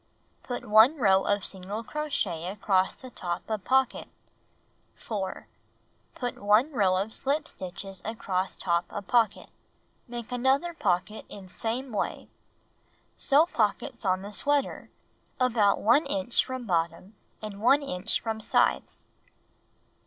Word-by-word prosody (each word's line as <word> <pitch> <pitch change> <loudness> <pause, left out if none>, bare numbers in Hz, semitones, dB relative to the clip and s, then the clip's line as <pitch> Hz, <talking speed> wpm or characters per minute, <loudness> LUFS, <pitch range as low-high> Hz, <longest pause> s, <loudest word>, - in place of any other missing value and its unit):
Put 245 - -6
1 220 +8 +6
row 195 -6 +4
of 205 -1 +1
single 195 +4 -4
crochet 215 - -2
across 190 -1 +1
the 255 -1 -12
top 175 -5 -4
of 215 -3 -3
pocket. 265 -1 +1 0.9
4. 195 -4 -5 0.7
Put 245 -1 -4
1 210 +8 +4
row 195 -8 +2
of 205 +4 -2
slip 285 +3 -1
stitches 190 +1 -8
across 195 -4 -2
top 170 -1 +1
of 205 - -5
pocket. 225 -2 +1 0.6
Make 240 -1 -7
another 265 +7 +1
pocket 195 - -1
in 195 -2 -10
same 235 +7 -4
way. 210 - -3 0.9
Sew 295 +3 +4
pockets 235 - -1
on 185 -1 +1
the 205 +1 -8
sweater, 285 +5 0 0.5
about 230 -5 +3
1 275 +8 +4
inch 280 -4 +1
from 260 -1 -5
bottom 170 +1 -1 0.3
and 210 -2 -7
1 270 +5 +5
inch 195 -5 -1
from 225 -1 -3
sides. - - +1
215 Hz, 130 wpm, -28 LUFS, 190-255 Hz, 0.9 s, 1